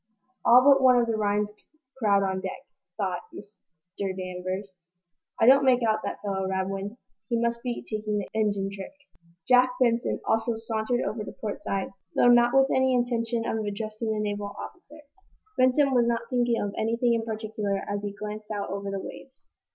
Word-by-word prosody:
"All 245 +2 +7
but 275 0 +6
one 255 -1 +6
of 240 - +3
the 230 -1 -1
Rhinds 210 0 0 0.4
crowd 205 -6 +2
on 190 -1 -1
deck," 260 +8 -6 0.3
thought - - -2
Mr. 185 -1 -8
Danvers. 185 +1 -4 0.7
"I - - +4
don't 270 +3 +7
make 250 -2 +4
out 215 -1 +2
that - - -5
fellow, 190 -2 -2
Radwin. 195 +3 -3 0.3
He 235 -1 +1
must 235 0 0
be 245 -1 -4
taking 215 -1 -2
the 200 - -3
engine 205 -3 0
trick." 195 +5 -8 0.5
Jack 250 0 +5
Benson 240 -2 +1
also 225 +1 +1
sauntered 225 +2 -1
over 215 0 -3
to - - -7
port 210 -2 -5
side, 195 0 -3 0.2
though 245 - +5
not 240 0 +6
with 270 0 +5
any 260 0 +3
intention 235 -1 0
of 220 -1 -1
addressing 215 +2 -3
the 215 - -1
naval 205 -1 -3
officer. 310 -4 -10 0.5
Benson 265 +2 +3
was 240 -2 +3
not 235 -1 +1
thinking 240 -2 +2
of 200 -1 -2
anything 230 +2 +1
in 230 -1 0
particular 215 -3 -3
as 205 0 -2
he 205 0 -4
glanced 210 +1 -7
out 205 -2 -3
over 200 0 -4
the 195 0 -3
waves. 265 +7 -11
220 Hz, 180 wpm, -27 LUFS, 200-240 Hz, 0.7 s, All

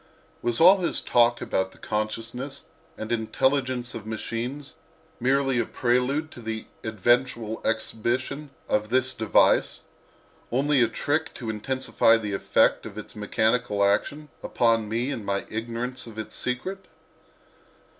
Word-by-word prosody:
Was 120 -1 0
all 185 +4 +8
his 175 - +2
talk 120 0 +3
about 95 0 -1
the - - -19
consciousness 115 +6 -4 0.3
and 110 +1 -6
intelligence 125 +2 0
of 110 -1 -7
machines 120 +5 -4 0.5
merely 135 0 +2
a 120 - +1
prelude 130 +6 0
to 110 -2 -6 0.2
eventual 115 +1 0
exhibition 125 +6 -2 0.2
of 105 0 0
this 130 +1 +3
device—only 130 +5 0
a 120 - +5
trick 145 +7 -2
to 115 -4 -4
intensify 115 0 +2
the 105 -2 -4
effect 100 - +2
of - - -11
its - - -8
mechanical 110 -3 +1
action 145 +9 0
upon 115 -2 +1
me 120 +5 -1
in 115 -6 -4
my 100 0 -2
ignorance 120 +3 -4
of 110 -1 -11
its 110 - -6
secret? 185 +11 -4
120 Hz, 125 wpm, -25 LUFS, 110-130 Hz, 0.5 s, all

